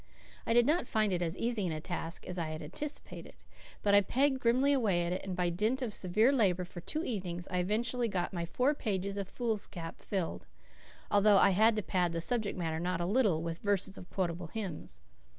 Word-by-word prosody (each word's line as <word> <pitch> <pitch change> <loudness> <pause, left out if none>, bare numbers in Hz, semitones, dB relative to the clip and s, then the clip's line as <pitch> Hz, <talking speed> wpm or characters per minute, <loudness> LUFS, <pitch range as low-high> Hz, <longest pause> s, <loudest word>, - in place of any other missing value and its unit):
I 230 - +3
did 240 0 +5
not 305 -1 +2
find 215 -3 +1
it 175 - 0
as 170 +1 -2
easy 230 -5 -1
a 155 -1 -3
task 170 0 -5
as 180 0 -5
I 160 -2 -2
had 155 0 -5
anticipated; 285 - -7 0.5
but 200 - +3
I 205 - +8
pegged 265 +6 +2
grimly 255 +4 +3
away 200 -10 +2
at 175 - -1
it, 185 - -3
and 190 -2 -4
by 175 -1 +1
dint 220 +9 0
of 225 -4 -3
severe 210 +8 +2
labour 190 -9 +2
for 175 0 -9
two 310 - -3
evenings 180 - -3
I 180 - 0
eventually 230 +6 0
got 190 -3 -2
my 170 -2 -2
four 255 - +2
pages 200 -7 -2
of 200 -1 -4
foolscap 205 -8 -4
filled, 190 -5 -3 0.6
although 205 0 +6
I 195 - +6
had 220 +4 +4
to 215 - -1
pad 180 -2 0
the 165 - -1
subject 215 +2 -1
matter 160 -2 -2
not 180 +1 -1
a 175 - 0
little 195 -6 +2
with 165 0 -4
verses 200 -1 0
of 180 - -10
quotable 175 -2 -2
hymns. 165 - -6
195 Hz, 210 wpm, -32 LUFS, 175-230 Hz, 0.6 s, I